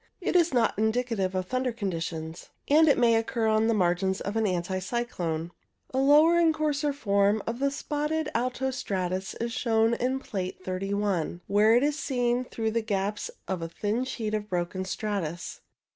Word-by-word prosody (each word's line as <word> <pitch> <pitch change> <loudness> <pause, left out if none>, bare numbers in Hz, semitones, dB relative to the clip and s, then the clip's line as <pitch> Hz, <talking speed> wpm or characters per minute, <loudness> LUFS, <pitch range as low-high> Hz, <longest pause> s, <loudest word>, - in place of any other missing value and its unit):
It 365 - -2
is 345 -1 +4
not 240 -3 +2
indicative 220 -4 0
of 185 0 -1
thunder 255 +4 -1
conditions, 165 -6 -4 0.2
and 315 +2 +5
it 285 - +5
may 235 -1 +4
occur 225 +1 0
on 220 0 +3
the 230 - +3
margins 190 0 +1
of 200 +2 -4
an 225 -1 +2
anticyclone. 180 -2 -2 0.4
A 260 - +1
lower 300 +5 +6
and 330 -1 +5
coarser 300 -1 0
form 205 -5 +1
of 230 +2 -3
the 280 +1 +2
spotted 300 +2 -2
alto 255 +2 -1
stratus 190 -5 -3
is 235 0 -3
shown 225 -2 +2
in 255 +3 0
Plate 185 -6 -5
31, 190 -2 -1
where 210 +3 +4
it 245 - +4
is 295 0 0
seen 250 -2 0
through 225 -2 -2
the 230 +1 0
gaps 205 -1 -2 0.2
in 185 -3 -2
a 165 - -3
thin 210 +8 -1
sheet 230 -5 -4
of 210 -1 -2
broken 180 +1 -2
stratus. 185 -4 -4
220 Hz, 175 wpm, -27 LUFS, 190-255 Hz, 0.4 s, lower